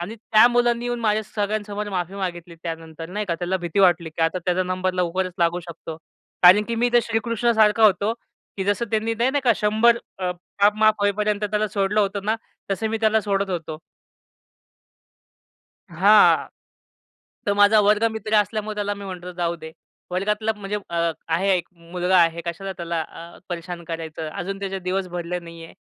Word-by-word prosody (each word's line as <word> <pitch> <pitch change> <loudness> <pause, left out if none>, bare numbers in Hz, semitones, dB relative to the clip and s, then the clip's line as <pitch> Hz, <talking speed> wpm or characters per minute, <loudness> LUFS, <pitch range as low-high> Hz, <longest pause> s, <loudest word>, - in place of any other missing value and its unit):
आणि 180 +6 -5
त्या 215 +1 +5
मुलांनी 240 -1 +1
येऊन 240 -1 -2
माझ्या 215 -1 +1
सगळ्यांसमोर 210 0 -3
माफी 180 -1 -3
मागितली. 175 -3 -5
त्यानंतर 165 -1 -7
नाही 210 +3 -4
का 170 - -1
त्याला 180 +1 -1
भीती 170 +3 -2
वाटली 175 -3 +3
की 160 +1 -3
आता 165 +3 +1
त्याचा 180 0 +1
नंबर 185 0 -1
लवकरच 185 +1 -1
लागू 170 +1 +1
शकतो. 165 -1 -9 0.5
कारण 185 +4 +8
की 235 - -1
मी 235 +1 +2
इथे 240 0 +4
श्रीकृष्णा 230 +1 0
सारखा 220 0 +4
होतो, 205 +1 +3 0.4
की 190 - -2
जसं 205 +3 0
त्यांनी 225 +1 0
नाही 235 +3 +1
नाही 285 +1 0
का, 240 - +5
100 220 +3 +3 0.2
अ, 185 -1 -1 0.3
पाप 205 +1 +6
माफ 215 0 +5
होईपर्यंत 210 +1 0
त्याला 210 0 0
सोडलं 205 0 +1
होतं 200 -1 -1
ना, 215 +2 +1 0.4
तसं 220 +3 -2
मी 225 - -1
त्याला 220 0 +3
सोडत 200 -2 -1
होतो. 160 -3 -4 2.1
हां. 200 +6 +5 1.0
तो 205 - +3
माझा 205 +1 +6
वर्गमित्र 215 +1 +1
असल्यामुळे 215 0 0
त्याला 205 -1 -1
मी 200 0 -9
म्हणतो 180 -1 -7
जाऊ 170 -1 -1
दे. 160 -1 -10 0.4
वर्गातला 210 +4 0
म्हणजे 205 0 -4
अ, 170 -1 0 0.2
आहे 170 +5 +1
एक 175 - -6
मुलगा 180 +2 -1
आहे 165 0 +1
कशाला 185 +3 -4
त्याला 170 -1 -3
अ, 170 +2 -12
परेशान 175 0 -6
करायचं 160 -1 -5
अजून 195 +5 -5
त्याचे 195 -1 -4
दिवस 185 +1 -2
भरले 175 0 -4
नाही 170 -1 -11
आहे, - - -15
195 Hz, 175 wpm, -23 LUFS, 175-215 Hz, 2.1 s, कारण